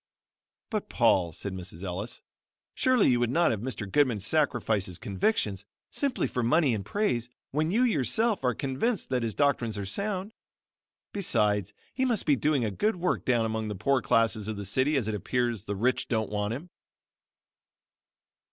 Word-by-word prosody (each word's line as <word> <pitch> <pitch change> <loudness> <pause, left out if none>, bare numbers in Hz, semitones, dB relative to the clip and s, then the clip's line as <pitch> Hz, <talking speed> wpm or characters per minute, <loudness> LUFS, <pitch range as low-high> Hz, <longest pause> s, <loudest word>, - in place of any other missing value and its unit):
"But 215 -2 -2
Paul," 95 -8 +3
said 95 +5 -6
Mrs. 90 -1 -7
Ellis, 95 +4 -5 0.5
"Surely 255 - +3
you 120 -1 +3
would 120 -1 +1
not 170 +6 +3
have 110 - -1
Mr. 115 -5 -4
Goodman 125 0 +2
sacrifice 115 -4 +1
his 90 -2 -5
convictions 100 - -1 0.3
simply 280 -3 0
for 125 - -2
money 140 +2 +3
and 105 -3 -2
praise, 120 - -1 0.2
when 155 +3 0
you 225 +7 +3
yourself, 215 - +1
are 125 -2 +1
convinced 140 - -1
that 130 -2 0
his 115 -2 -2
doctrines 125 -7 +1
are 100 - -3
sound? 200 - -3 0.8
Besides 105 - +1 0.2
he 260 - -1
must 240 -5 +1
be 145 - +4
doing 140 -3 +1
a 105 - -1
good 215 - 0
work 180 0 -1
down 120 -3 +2
among 110 0 -2
the 105 - -4
poor 130 +7 +1
classes 110 -2 +2
of 110 -1 -3
the 100 - -5
city 130 +9 +1
as 120 -6 -1
it 110 - -1
appears 115 +1 -1
the 100 - -3
rich 125 +6 +1
don't 110 -3 -1
want 105 +2 -1
him." 165 +7 -9
120 Hz, 175 wpm, -28 LUFS, 105-155 Hz, 0.8 s, be